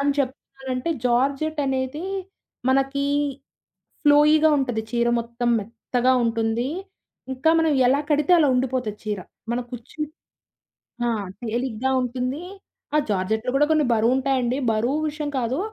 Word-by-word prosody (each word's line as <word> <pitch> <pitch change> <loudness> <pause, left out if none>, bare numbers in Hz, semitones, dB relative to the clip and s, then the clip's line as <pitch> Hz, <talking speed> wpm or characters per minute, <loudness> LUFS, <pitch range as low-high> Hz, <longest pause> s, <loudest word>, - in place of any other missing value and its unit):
అని 280 0 +2
చెప్తున్నానంటే 265 +1 -3
జార్జెట్ 275 +6 +1
అనేది 265 +4 -2 0.7
మనకి 270 +1 +1 1.0
ఫ్లోయిగా 300 +2 +6
ఉంటది, 245 -5 -1
చీర 235 0 +2
మొత్తం 235 +1 -3
మెత్తగా 240 +4 0
ఉంటుంది. 230 +1 0 0.6
ఇంకా 265 +5 +2
మనం 320 -1 +2
ఎలా 275 +3 +3
కడితే 300 +3 +3
అలా 300 -3 +4
ఉండిపోతది 250 -4 -1
చీర, 210 -2 -2 0.3
మన 240 - 0
కుచ్చి 245 +5 -9 1.1
ఆ! - - +2 0.3
తేలిగ్గ 235 +1 -3 0.2
ఉంటుంది 255 +4 -2 0.5
ఆ - - +5
జార్జెట్లు 220 +4 0
కూడా 295 +2 +4
కొన్ని 310 -1 +4
బరువు 230 +2 +3
ఉంటాయండి, 260 -1 0
బరువు 240 +7 0
విషయం 300 -1 -4
కాదు, 250 +2 -1
255 Hz, 120 wpm, -23 LUFS, 235-280 Hz, 1.1 s, ఫ్లోయిగా